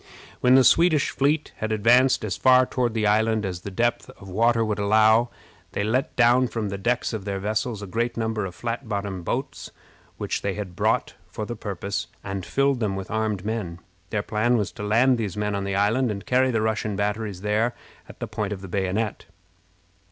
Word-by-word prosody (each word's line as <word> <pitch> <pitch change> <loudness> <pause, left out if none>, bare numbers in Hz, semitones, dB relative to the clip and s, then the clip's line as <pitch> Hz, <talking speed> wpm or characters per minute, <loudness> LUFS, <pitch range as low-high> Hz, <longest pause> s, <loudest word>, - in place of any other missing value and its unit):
When 125 +1 +5
the 135 - +7
Swedish 165 0 +4
fleet 145 +3 0
had 110 0 -3
advanced 120 +5 +4
as - - -2
far 130 0 +5
toward 125 -3 -1
the 110 -1 +1
island 110 +1 +2
as 90 -2 -4
the 100 - -6
depth 120 +5 -1
of - - -14
the - - -9
water 115 +2 +3
would 105 -1 -2
allow, 110 +3 +4 0.4
they 100 - -1
let 125 +6 0
down 125 +1 +4
from 115 -3 -3
the 100 0 -5
decks 120 +4 0
of 110 -3 -4
their 100 -1 -3
vessels 105 +2 -2
a - - -4
great 115 +5 -2
number 110 -2 -1
of 90 - -11
flat 120 0 -4
bottomed 100 -4 -3
boats, - - -3 0.5
which - - -3
they 100 -2 -2
had 95 -4 -6
brought - - 0
for 110 - -5
the 120 - -5
purpose, 100 0 -4 0.2
and 95 -1 -5
filled 140 -1 +1
them 105 -4 -1
with 95 -1 -6
armed 110 -3 -1
men. 105 -7 -3 0.3
Their 105 -1 -1
plan 115 +4 +1
was 105 -3 -1
to 110 - -8
land 120 +4 +3
these 105 -3 -3
men 105 0 -1
on 100 -1 -2
the 100 0 -2
island, 110 +6 +2
and 100 -2 -5
carry 130 +1 +3
the 115 -3 0
Russian 110 -1 -1
batteries 105 -1 -2
there 105 +4 0 0.3
at - - -13
the - - -4
point 105 -1 -3
of 95 - -7
the 95 - -8
bayonet. 100 +3 -2
110 Hz, 210 wpm, -24 LUFS, 100-120 Hz, 0.5 s, the